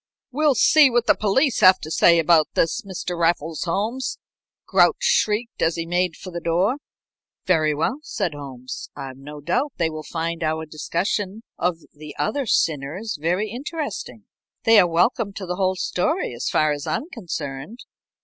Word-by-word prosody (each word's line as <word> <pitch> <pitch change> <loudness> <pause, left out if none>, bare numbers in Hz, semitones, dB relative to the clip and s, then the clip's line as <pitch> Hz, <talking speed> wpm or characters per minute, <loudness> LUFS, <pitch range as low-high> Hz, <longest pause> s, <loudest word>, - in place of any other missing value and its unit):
"We'll 295 +1 +2
see 295 +5 +6
what 240 -1 +1
the - - +5
police 235 +6 +1
have 185 0 +7
to 155 - -7
say 170 +1 +5
about 165 -1 +4
this, 165 - +1
Mr. 185 -2 -5
Raffles 165 -2 0
Holmes," 215 +9 -2 0.5
Grouch - - +4
shrieked, 220 +3 +1
as 165 0 +2
he 165 - -3
made 175 0 0
for 185 - -10
the 170 - -4
door. 180 +9 +1 0.7
"Very 155 -4 +2
well," 250 - -1
said 200 - -3
Holmes. 130 -3 -8
"I've 135 -2 -7
no 145 +2 -10
doubt 250 - -1
they 165 -2 0
will 155 0 -6
find 165 +1 -4
our 160 0 -1
discussion 190 +7 -3 0.2
of 175 -1 0 0.2
the 150 0 -11
other 255 - -1
sinners 160 +5 -1
very 180 +6 0
interesting. 295 +5 -5 0.4
They 225 -2 +7
are 180 - +5
welcome 200 +5 +1
to 195 -1 -6
the 180 0 -4
whole 190 -1 +1
story 185 - -1
as 120 - -3
far 155 -1 +2
as 145 -1 -4
I - - 0
am 315 - -5
concerned." 165 - -6
175 Hz, 170 wpm, -22 LUFS, 155-220 Hz, 0.7 s, have